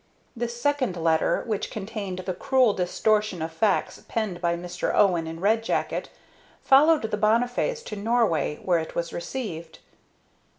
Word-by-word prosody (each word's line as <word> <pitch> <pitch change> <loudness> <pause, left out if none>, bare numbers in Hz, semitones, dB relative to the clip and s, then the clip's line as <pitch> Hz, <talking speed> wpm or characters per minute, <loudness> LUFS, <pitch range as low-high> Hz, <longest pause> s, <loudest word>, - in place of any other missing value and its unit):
This 235 0 -4
second 260 -8 0
letter, 160 -1 +1
which 215 -4 -2
contained 200 -3 -5
the 185 - -2
cruel 250 +4 +3
distortion 210 +1 0
of 160 - -4
facts 200 +4 0
penned 210 -6 -3
by 170 0 +1
Mr. 175 0 -3
Owen 175 -5 +3
in 165 0 -6
Red 220 +4 +2
Jacket, - - -2 0.5
followed 300 +3 +5
the 215 -1 -2
Bonnifays 245 - +1
to 210 - -6
Norway, 210 -8 +1
where 175 -2 +2
it 160 - -6
was 170 0 -3
received. 170 -5 -5
210 Hz, 145 wpm, -25 LUFS, 175-235 Hz, 0.5 s, followed